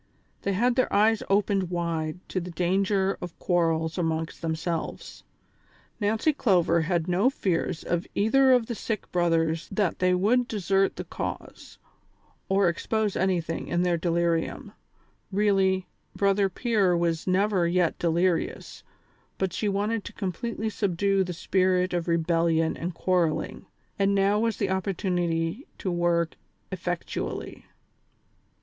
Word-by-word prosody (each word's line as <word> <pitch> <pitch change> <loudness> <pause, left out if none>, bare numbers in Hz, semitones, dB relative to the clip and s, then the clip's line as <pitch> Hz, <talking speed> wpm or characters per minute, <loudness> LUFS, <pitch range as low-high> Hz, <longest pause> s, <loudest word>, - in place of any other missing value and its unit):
They 200 - -1
had 240 +6 +2
their 255 - +2
eyes 215 +2 +3
opened 195 -2 +2
wide 170 -1 -3
to 185 - -1
the 175 - -6
dan 180 +3 +1
ger 195 -1 0
of 175 -2 -7
quarrels 165 -1 0
amongst 160 -1 -2
themselves. 165 0 -4 0.8
Nancy 220 +8 +1
Clover 175 - +2
had 170 0 0
no 185 +8 +3
fears 180 -8 -1
of 175 +1 -2
either 260 +6 +4
of 250 -3 +4
the 235 - -4
sick 220 -1 -4
brothers 165 -2 +1
that 195 -2 0
they 180 0 +3
would 235 +7 +2
de 215 - -3
sert 195 +1 +2
the - - -5
cause, - - -7 0.7
or 195 -1 +3
expose 210 +4 -1
anything 175 -3 -1
in 175 +1 0
their 175 -1 +2
delirium; 170 -1 -1 0.6
really, 190 -2 +2 0.3
Brother 200 0 +2
Pier 200 -5 +1
was 170 0 -1
never 190 -1 +2
yet 175 -1 +1
delirious, 170 +1 0 0.6
but 190 -2 -1
she 210 - -1
wanted 205 +2 -1
to - - -8
completely 220 +4 -3
subdue 195 -1 +1
the 180 - -5
spirit 185 +1 +1
of 175 -1 -1
rebellion 165 -1 +1
and 170 +1 -5
quarrelling, 170 -4 0 0.3
and 200 0 +3
now 200 +1 +3
was 230 0 0
the 195 -2 -1
opportunity 180 - -1
to 185 - -3
work 170 -1 0 0.3
effectual 175 -2 -3
ly. - - -10
185 Hz, 140 wpm, -26 LUFS, 170-200 Hz, 0.8 s, either